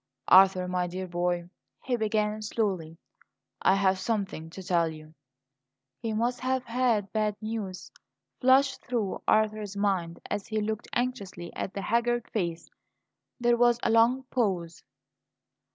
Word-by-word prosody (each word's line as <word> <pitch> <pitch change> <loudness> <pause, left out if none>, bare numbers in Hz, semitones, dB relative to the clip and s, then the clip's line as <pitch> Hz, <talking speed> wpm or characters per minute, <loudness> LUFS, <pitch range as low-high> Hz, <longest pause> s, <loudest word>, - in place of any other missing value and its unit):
"Arthur, 185 -1 +6
my 180 0 -1
dear 185 +2 -5
boy," 175 0 -1 0.4
he 255 - 0
began 215 -1 0
slowly; 190 -7 -2 0.6
"I 190 - +4
have 190 -1 +2
something 190 -6 -2
to 190 +3 -9
tell 175 -2 +2
you." 155 0 -11 0.9
"He 225 - -3
must 240 +3 0
have 260 0 -1
had 235 -4 0
bad 215 -1 +1
news," 215 -4 -5 0.5
flashed 270 +2 +4
through 235 -6 -2
Arthur's 215 -2 +1
mind, 190 -5 0
as 205 -1 -3
he 220 -1 -1
looked 215 +1 -3
anxiously 200 -9 -3
at 195 - -4
the 195 - -3
haggard 235 +1 +1
face. 170 -5 -2 0.7
There 240 0 +3
was 240 0 +4
a - - +2
long 235 +4 +4
pause. 185 -9 -1
210 Hz, 135 wpm, -28 LUFS, 185-235 Hz, 0.9 s, Arthur